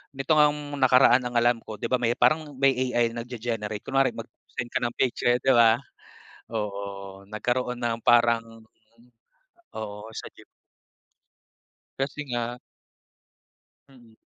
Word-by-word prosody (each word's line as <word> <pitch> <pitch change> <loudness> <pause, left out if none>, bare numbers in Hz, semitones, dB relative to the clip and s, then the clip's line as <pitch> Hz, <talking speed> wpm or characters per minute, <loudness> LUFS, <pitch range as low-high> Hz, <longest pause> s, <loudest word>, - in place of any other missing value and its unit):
Nito 135 +4 -3
ngang 150 -1 +2
nakaraan 130 -1 +5
ang 120 - -8
alam 120 0 +3
ko, 110 - -9
'di 115 - -5
ba, 125 - +2
may 120 -1 +1
parang 155 0 +1
may 135 +1 +4 0.2
AI 120 -1 +2
nagge-generate. 115 -3 -5
Kunwari, 135 0 +1
mag-send 120 0 -8
ka - - 0
ng 120 -1 -3
picture, 120 -1 +1
'di 135 - +4
ba? 115 -2 +6 0.8
Oo. 100 -2 -6
Nagkaroon 125 +4 -2
ng 120 -1 -2
parang 115 -1 +2 1.1
oo, 105 0 -7
sa - - -7
Ghib - - -16 1.5
Kasi 140 +2 -3
nga 120 -1 -3 1.3
Mm. 120 -4 -19
120 Hz, 125 wpm, -26 LUFS, 115-130 Hz, 1.5 s, ba